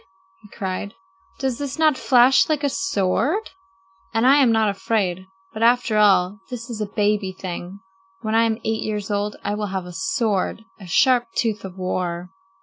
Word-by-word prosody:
he 210 - -17
cried; 195 +2 -5 0.4
"does 265 -2 -2
this 285 0 -4
not 310 -2 +4
flash 255 +2 +4
like 305 -2 0
a 285 - +2
sword? 295 - 0 0.6
And 225 +2 +2
I 270 +2 +6
am 265 -5 +5
not 220 -1 +3
afraid. 195 -2 -1 0.3
But 220 - -6
after 235 -2 +3
all, 195 -1 +4
this 240 -1 -7
is 220 -2 -5
a 210 - -1
baby 205 -2 0
thing! 185 0 -7 0.4
When 220 -1 -2
I 225 +1 +4
am 225 -1 0
eight 220 0 -1
years 210 -1 -3
old 205 +1 -1
I 205 - -1
will 210 0 -2
have 190 -2 -4
a 180 - -9
sword, 205 +4 -1 0.2
a 190 - -11
sharp 245 +7 +3
tooth 220 -3 -1
of 190 -1 -8
war." 180 -1 -3
210 Hz, 180 wpm, -22 LUFS, 190-240 Hz, 0.6 s, I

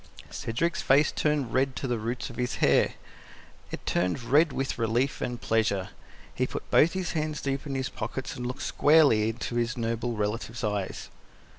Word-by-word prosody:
Cedric's 170 +10 -1
face 145 +3 +4
turned 150 -5 0
red 130 0 +1
to 125 - -4
the 120 -2 -1
roots 115 +3 -3
of - - -12
his 125 0 -1
hair; - - +3 0.7
it - - -7
turned 90 +7 0
red 145 +6 +4
with 135 -2 -3
relief 120 +4 0
and 120 -1 -3
pleasure. 105 -5 0 0.4
He - - 0
put - - -7
both 165 +2 +5
his 185 -2 -2
hands 155 -2 -2
deep 135 +1 -3
into 135 -1 -2
his 130 0 -2
pockets 125 +3 -5
and 125 -2 -4
looked 125 +2 -5
squarely 145 -8 +4
into 120 +1 -4
his 120 0 0
noble 115 +1 -1
relative's 110 +3 -3
eyes. 105 -3 -3
125 Hz, 175 wpm, -28 LUFS, 115-140 Hz, 0.7 s, both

